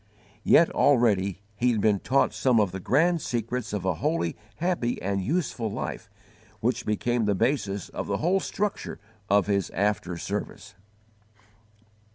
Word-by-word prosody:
Yet 165 - +5
already 100 -8 +2
he 120 +4 +2
had 110 - 0
been 105 -1 +3
taught 135 +7 +2
some 125 -4 +3
of 100 -4 +2
the 95 - -5
grand 165 - +2
secrets 120 -1 -3
of 105 -3 -3
a 95 - +2
holy, 145 - 0 0.2
happy, 170 -6 -1
and 100 0 -1
useful 120 - -1
life, - - -5 0.5
which - - -1
became 115 +2 0
the 100 -1 +2
basis 105 -4 0
of - - -5
the - - 0
whole 180 +5 +2
structure 205 +2 -3 0.3
of 100 -1 +4
his 100 -4 0
after 95 -2 -1
service. - - -5
110 Hz, 150 wpm, -26 LUFS, 100-140 Hz, 0.5 s, Yet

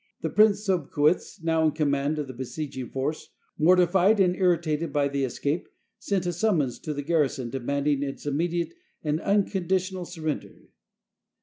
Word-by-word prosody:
The - - -2
Prince 210 -1 +4
Sobcuitz, 165 0 +1
now 160 -1 +2
in 155 -2 +3
command 145 -1 0
of 150 - -2
the 130 - -8
besieging 130 +1 -5
force, 140 +4 -3 0.3
morti 180 +3 +6
fied 190 +4 +3
and 180 -2 +4
irritated 170 -4 +1
by 145 -1 +2
the 140 0 -1
escape, 140 +5 -2 0.3
sent 195 -3 -1
a 175 - -1
summons 165 - +1
to 155 - -4
the 145 - -3
garrison 140 -6 0
demanding 140 +2 0
its 140 0 -5
immediate 170 - -1 0.3
and 150 0 0
unconditional 190 -2 0
surrender. 160 -3 -5
160 Hz, 150 wpm, -26 LUFS, 140-180 Hz, 0.3 s, morti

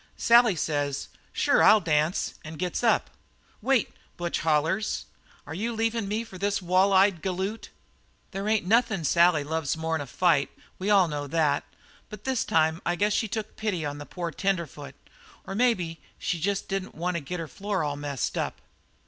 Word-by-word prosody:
"Sally 235 -3 +5
says, 145 -3 -2 0.2
'Sure - - +3
I'll 215 - +7
dance,' 155 -1 0
and 155 +1 -8
gets 180 +6 -2
up. 230 - +2 0.5
"'Wait!' 255 0 +1 0.3
hollers 165 +3 0
Butch; - - -30 0.4
'are - - -7
you 225 +7 -2
leavin' 225 -1 0
me 215 +3 -1
for 190 -5 -11
this 200 +1 0
wall 185 +2 +3
eyed 190 -3 +4
galoot?' 190 +3 -3 0.6
"There 195 +2 -4
ain't 215 -4 +2
nothin' 220 -3 +2
Sally 170 -1 +4
loves 160 0 -2
more'n 160 -1 -1
a 140 - -6
fight 165 0 +2 0.3
we 190 +2 -2
all 195 -4 +5
know 145 -2 -4
that. 150 -1 +1 0.5
But 215 - -10
this 260 -2 0
time 160 0 +2
I 175 - 0
guess 205 +3 +1
she 225 - +1
took 215 +1 -5
pity 195 -8 -2
on 145 0 -4
the 145 - -8
poor 175 -2 -4
tenderfoot, 170 -6 -3 0.5
or - - -5
maybe 195 -8 +1 0.2
she 175 - -2
jest 200 +4 -1
didn't 195 -1 -4
want 180 +2 -2
to 170 - -1
get 180 +5 -5
her 165 - -4
floor 200 +1 -2
all 145 -1 -2
messed 145 -2 -3
up. - - -3
180 Hz, 180 wpm, -27 LUFS, 160-205 Hz, 0.6 s, I'll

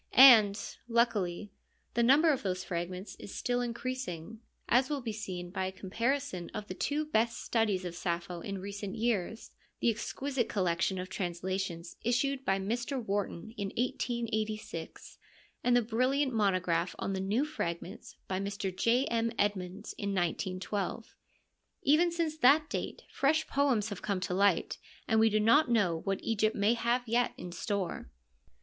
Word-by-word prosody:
And, 220 -6 +9 0.3
luckily, 210 -5 +1 0.4
the 235 - +2
number 285 +7 +6
of 265 - -3
those 185 -2 -2
fragments 180 +2 -4
is 200 - -9
still 245 0 0
increasing, 235 -5 -4 0.3
as 255 +3 +3
will 295 -2 -1
be 235 -4 -4
seen 180 -4 -5
by 190 -1 -1
a - - -4
comparison 205 +1 -2
of 210 - -4
the - - -5
two 295 +10 -1
best 230 -5 +1
studies 210 -5 +1
of 175 - -4
Sappho 170 0 -3
in 200 +2 -4
recent 200 +1 -5
years, 225 -2 -1 0.3
the 235 - +3
exquisite 260 +3 -2
collection 185 -1 0
of 180 0 -4
translations 180 -1 -3
issued 265 +3 0
by 195 -5 +2
Mr. 235 +7 -2
Wharton 205 -1 -3
in 200 -1 -2
1886, 220 - -3 0.4
and 245 0 +4
the 245 - +3
brilliant 255 +4 +1
monograph 185 -5 +1
on 195 - -2
the 190 - -2
new 205 +9 +1
fragments 175 - -5
by 185 0 -1
Mr. 195 -1 -3
J. 240 +6 +3
M. 230 0 0
Edmonds 200 0 -2
in 200 -1 -2
1912. 185 +4 -2 0.7
Even 325 +5 +4
since 335 -2 -1
that 300 +4 +5
date - - -4
fresh 310 +3 +2
poems 260 -7 +1
have 205 - -6
come 200 -3 -1
to 185 - -2
light, 195 -2 +2 0.3
and 220 - +3
we 225 0 +5
do 215 0 +2
not 240 +7 +5
know 190 -8 +2
what 195 +2 -2
Egypt 220 -1 +1
may 205 +3 +3
have 240 +1 0
yet 240 +2 +2
in 180 - -7
store. 185 +1 -3
215 Hz, 155 wpm, -31 LUFS, 185-245 Hz, 0.7 s, And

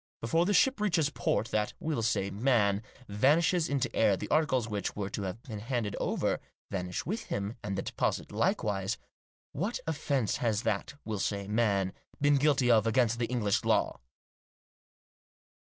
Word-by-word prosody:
Before 165 +10 +1
the 205 - +2
ship 265 -1 +4
reaches 165 -8 +2
port 110 -5 0
that, 105 -1 0
we'll 155 -7 -1
say, 105 -3 0
man, 105 -3 +2 0.3
vanishes 155 - +3
into 130 -4 -1
air, 105 -4 +4
the - - -5
articles 130 -7 +2
which 105 -2 -3
were 100 -1 -3
to - - -3
have 100 +4 -5
been 110 -6 -6
handed 115 -2 -2
over, - - 0 0.3
vanish 90 -2 -3
with 210 +8 -3
him, 100 +3 -3
and 95 -2 -3
the 95 - -2
deposit - - -2
likewise. 100 0 0 0.5
What 200 - -2
offence 140 - 0
has 115 -2 0
that, 110 +5 -1
we'll 110 -2 -3
say, 100 0 -2
man, 100 -3 +1 0.3
been 145 0 +4
guilty 135 -3 +3
of 110 -1 +4
against 115 -1 +2
the 115 - 0
English 110 -5 0
law?" - - +1
115 Hz, 160 wpm, -30 LUFS, 100-140 Hz, 0.5 s, ship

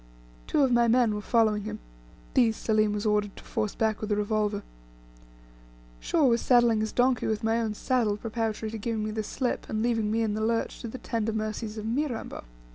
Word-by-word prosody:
Two 290 - +3
of 265 - +3
my 240 -1 +4
men 235 -2 +3
were 210 - -3
following 215 -2 +2
him; - - -4 0.6
these 230 -3 +3
Selim 215 -1 +2
was 210 +1 -3
ordered 210 -1 +1
to - - -11
force 215 -3 -2
back 220 -1 0
with 215 0 -3
a - - +3
revolver. 210 0 0 1.4
Shaw 315 - +2
was 235 -2 +3
saddling 240 -3 +4
his 220 0 -1
donkey 250 0 +2
with 220 -1 -1
my 225 +1 +2
own 220 -2 -2
saddle, 225 -4 +1
preparatory 220 -1 -3
to 225 - -5
giving 220 0 -2
me 215 - -2
the 220 0 -2
slip, 245 +4 -3
and 215 0 -1
leaving 225 -3 +1
me 225 +1 +1
in 215 -2 0
the 215 - -2
lurch 225 +1 -1
to - - -5
the 230 - -6
tender 225 -3 -2
mercies 215 0 -3
of 215 - -5
Mirambo. 245 - -3
220 Hz, 205 wpm, -27 LUFS, 215-235 Hz, 1.4 s, my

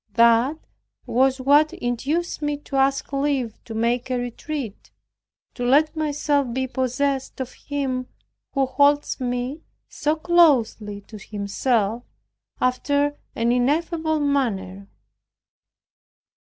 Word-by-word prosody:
That 235 +5 +4 0.5
was 265 +2 +2
what 290 +4 +4
induced 280 +9 -2
me 295 -1 -1
to 285 -1 -8
ask 270 +1 +1
leave 275 -5 -1
to 225 - -7
make 235 +3 0
a 255 - 0
retreat, 245 -1 -5 0.6
to 245 - -5
let 290 +6 +3
myself 290 -3 0
be 260 +2 -1
possessed 260 +2 -1
of 260 -1 -4
Him 265 -3 -3 0.5
who 275 -1 +2
holds 285 +3 +2
me 250 +4 -3 0.3
so 300 +1 -1
closely 270 -12 +3
to 215 +1 -12
Himself 210 +2 -1 0.6
after 285 +3 +1 0.2
an 235 +1 +1
ineffable 315 +5 +1
manner. 200 -10 -1
265 Hz, 110 wpm, -23 LUFS, 240-290 Hz, 0.6 s, That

